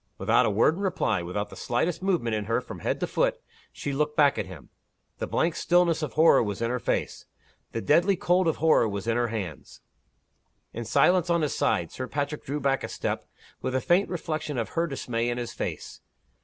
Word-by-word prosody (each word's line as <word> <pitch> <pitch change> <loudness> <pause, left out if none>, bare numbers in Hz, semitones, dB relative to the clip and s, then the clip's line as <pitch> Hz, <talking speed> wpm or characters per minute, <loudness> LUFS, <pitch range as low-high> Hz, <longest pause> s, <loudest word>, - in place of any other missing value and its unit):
Without - - +3
a - - +2
word 105 +9 +3
in 175 - -7
reply, 135 - 0
without 100 +4 -4
the - - -9
slightest 155 +10 -1
movement 170 - 0
in 105 -1 -2
her 115 +3 +1
from 125 - -9
head - - -1
to - - 0
foot, - - 0 0.3
she 140 - -4
looked 150 +2 -1
back 145 -2 +4
at - - -3
him. 90 -7 -11 0.5
The - - -2
blank 165 0 0
stillness 170 -1 +2
of 150 - -3
horror 160 +1 +6
was 105 -3 -3
in 115 +1 -1
her 125 - -1
face. - - -2 0.5
The 115 - -3
deadly 175 - +3
cold 180 0 +2
of 160 - +2
horror 155 -7 +3
was 100 0 -4
in 115 -1 +1
her 120 0 +1
hands. 100 -9 -6 0.9
In 115 +1 -5
silence, 180 - +3
on 170 -2 +2
his 150 - -1
side, - - 0
Sir 130 - -5
Patrick 145 +2 -3
drew 145 +2 -3
back 135 -1 0
a - - -2
step, - - -3 0.4
with 130 - -2
a - - +3
faint 175 +9 +2
reflection 155 -5 -3
of 115 - -2
her 170 +1 0
dismay 120 -5 -2
in 120 - -2
his 120 -1 -4
face. - - -5
140 Hz, 215 wpm, -27 LUFS, 115-165 Hz, 0.9 s, horror